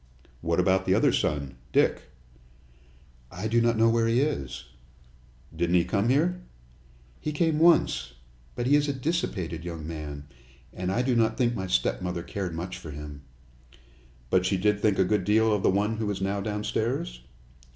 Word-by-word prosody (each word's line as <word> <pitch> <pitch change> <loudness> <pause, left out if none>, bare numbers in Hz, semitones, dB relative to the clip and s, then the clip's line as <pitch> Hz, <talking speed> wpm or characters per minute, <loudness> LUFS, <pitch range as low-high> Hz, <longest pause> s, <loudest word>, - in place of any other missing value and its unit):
"What 85 +2 0
about 95 +1 +2
the 95 - +4
other - - +4
son 70 -4 -1
Dick?" - - +1 1.2
"I 90 +5 -4
do 115 +2 +2
not 115 -1 +2
know 115 +1 +4
where 115 0 +2
he 115 +2 +2
is." 70 - -2 0.9
"Didn't 85 +2 +1
he 85 - +4
come 105 +2 0
here?" 175 +7 +2 0.8
"He 150 - -3
came 155 0 +1
once. 65 - +3 0.4
But 120 - -2
he 140 +3 +4
is 145 0 +2
a 140 - 0
dissipated 105 - -2
young 85 -3 -6
man, 75 -3 -6 0.5
and 90 0 -3
I 120 +5 +1
do 125 -1 +1
not 115 -1 +2
think 120 -2 +2
my 95 -4 -4
stepmother 90 +3 -1
cared 90 -4 -4
much 90 +3 -5
for 80 - -9
him." 75 -1 -8 1.1
"But 95 -1 +4
she 95 +1 +1
did 105 +2 +1
think 105 -3 +2
a 95 - +4
good 105 0 +1
deal 110 +3 +3
of 105 - 0
the - - +3
one 105 +3 +1
who 110 -2 -2
is 100 - -2
now 100 +1 -1
downstairs?" 105 - -2
100 Hz, 175 wpm, -27 LUFS, 85-115 Hz, 1.2 s, the